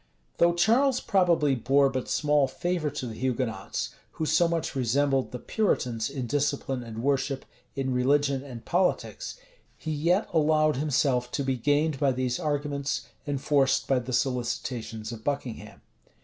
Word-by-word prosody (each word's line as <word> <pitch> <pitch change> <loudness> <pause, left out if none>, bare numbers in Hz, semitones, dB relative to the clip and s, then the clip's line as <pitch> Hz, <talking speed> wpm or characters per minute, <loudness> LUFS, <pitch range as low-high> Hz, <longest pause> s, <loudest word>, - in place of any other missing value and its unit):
Though 170 0 +4
Charles 240 +9 +3
probably 170 -7 +2
bore 135 +3 +3
but 130 -2 -3
small 150 -2 +2
favor 170 +2 -1
to 130 - -5
the 115 - -5
Hugonots, 115 -4 -2 0.2
who 160 - -2
so 160 +2 +3
much 165 -2 -2
resembled 135 +2 +1
the 125 - -6
Puritans 125 - 0
in 130 -3 -4
discipline 140 -1 -1
and 115 -1 -7
worship, 135 0 0 0.3
in 130 -1 -1
religion 140 +1 +2
and 125 -5 -9
politics, 180 - -1 0.4
he 160 - -5
yet 170 +7 +1
allowed 155 -2 +3
himself 135 -3 +1
to 140 - 0
be 135 -1 0
gained 145 +3 +1
by 140 -3 +3
these 125 -1 -1
arguments, 145 -1 -2 0.2
enforced 140 -1 +1
by 135 -2 +3
the 125 +1 -6
solicitations 120 -3 -2
of 115 -1 -8
Buckingham. 120 -6 -4
140 Hz, 150 wpm, -27 LUFS, 125-150 Hz, 0.4 s, Though